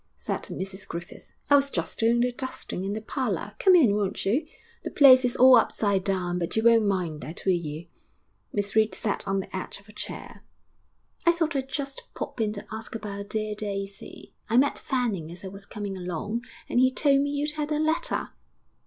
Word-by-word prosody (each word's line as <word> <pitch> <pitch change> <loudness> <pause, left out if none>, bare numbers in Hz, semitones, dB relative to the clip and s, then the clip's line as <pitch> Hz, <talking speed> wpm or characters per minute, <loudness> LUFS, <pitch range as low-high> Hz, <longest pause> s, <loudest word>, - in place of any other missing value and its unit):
said - - -3
Mrs 190 +1 -6
Griffith. 170 +1 -8 0.2
'I 285 - +9
was 280 0 +2
just - - -3
doing 235 +1 +3
the 250 +1 +2
dusting 245 -7 -4
in 195 +1 -2
the 215 - -4
parlour. 210 - -2
Come 375 -1 +6
in, 250 - +5
won't 205 -1 -1
you? 235 +11 +1 0.4
The - - -3
place 260 -3 +7
is 250 0 0
all 255 +1 +8
upside 200 -4 +1
down, 180 -2 -1
but 170 - -3
you 220 - +1
won't 230 -2 +5
mind 175 -6 -1
that, 160 - -8
will 190 - +4
you?' 160 -1 -4 0.7
Miss 205 0 -2
Reed 220 0 +3
sat 205 - -2
on 195 0 +1
the 190 - -9
edge 185 - -5
of 200 - -22
a 210 - -15
chair. - - -7 0.8
'I - - +9
thought 325 -2 -1
I'd 265 -1 -2
just 275 -1 -4
pop 235 - -4
in 215 -1 +1
to 200 - -8
ask 220 +1 -7
about 200 -2 -6
dear 215 -1 -2
Daisy. 200 -2 -6 0.2
I 230 - +3
met 280 +2 +3
Fanning 220 - -2
as 180 +3 -9
I - - -4
was 195 +1 -10
coming 205 -3 -5
along 190 +6 -4 0.2
and - - +1
he 255 +1 +5
told 275 +1 +3
me 285 - 0
you'd 290 +1 -1
had 300 0 -4
a 300 - +1
letter.' 315 +2 0
215 Hz, 205 wpm, -26 LUFS, 195-260 Hz, 0.8 s, I